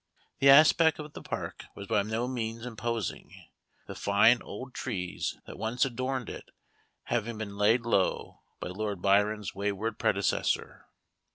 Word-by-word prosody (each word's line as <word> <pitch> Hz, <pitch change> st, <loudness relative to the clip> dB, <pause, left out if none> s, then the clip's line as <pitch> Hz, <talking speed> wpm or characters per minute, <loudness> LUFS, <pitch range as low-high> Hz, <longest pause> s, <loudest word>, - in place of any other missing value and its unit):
The 140 Hz, -, +5 dB
aspect 155 Hz, +3 st, +7 dB
of 150 Hz, -1 st, -8 dB
the -, -, -8 dB
park -, -, -5 dB
was 100 Hz, -, -7 dB
by 100 Hz, -, +2 dB
no 110 Hz, +4 st, -2 dB
means 115 Hz, -2 st, -4 dB
imposing, 115 Hz, -3 st, -4 dB, 0.5 s
the -, -, -7 dB
fine 110 Hz, +4 st, +4 dB
old 125 Hz, +5 st, -8 dB
trees 90 Hz, -8 st, -3 dB
that -, -, -10 dB
once 115 Hz, +4 st, +1 dB
adorned 130 Hz, 0 st, -3 dB
it -, -, -8 dB, 0.5 s
having 115 Hz, -1 st, -2 dB
been 100 Hz, -2 st, -6 dB
laid 105 Hz, +4 st, +3 dB
low 115 Hz, -5 st, 0 dB, 0.2 s
by -, -, -5 dB
Lord 100 Hz, +1 st, -3 dB
Byron's 105 Hz, +1 st, +2 dB
wayward 100 Hz, +3 st, -2 dB
predecessor. 100 Hz, -3 st, 0 dB
110 Hz, 145 wpm, -29 LUFS, 100-125 Hz, 0.5 s, aspect